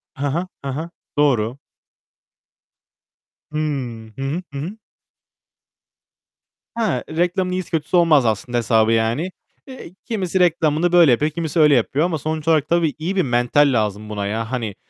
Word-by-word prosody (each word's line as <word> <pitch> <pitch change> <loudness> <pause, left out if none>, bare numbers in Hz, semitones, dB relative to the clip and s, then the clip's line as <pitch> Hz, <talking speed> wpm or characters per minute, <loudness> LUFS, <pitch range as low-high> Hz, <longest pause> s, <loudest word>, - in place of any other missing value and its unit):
Ha 140 +1 -2
ha, 175 +4 -2 0.2
ha 135 - -3
ha. 160 +3 -4 0.3
Doğru. 125 -4 +2 1.9
Hı. 155 - -4 0.6
Hı 135 - -8
hı, 145 +7 -2
hı 140 - -4
hı. 185 +9 -6 2.0
He, 225 -2 0
reklamın 180 +1 +1
iyisi 185 0 -4
kötüsü 165 +2 0
olmaz 160 -6 +4
aslında 115 +2 -1
hesabı 115 -1 +2
yani. 115 +11 0 0.4
Eee, 260 -9 -10
kimisi 190 -6 -1
reklamını 165 -1 +2
böyle 170 -5 +6
yapıyor, 150 +6 +2
kimisi 165 0 -2
öyle 150 -2 +6
yapıyor 135 +6 +1
ama 165 -3 -1
sonuç 155 +2 -4
olarak 155 -3 +2
tabii 170 -3 +2
iyi 175 +5 -3
bir 185 - +3
mental 125 +2 +2
lazım 105 -1 -1
buna 105 -1 -3
ya. 110 +2 -3
Hani 115 -6 -3
150 Hz, 150 wpm, -20 LUFS, 120-170 Hz, 2.0 s, böyle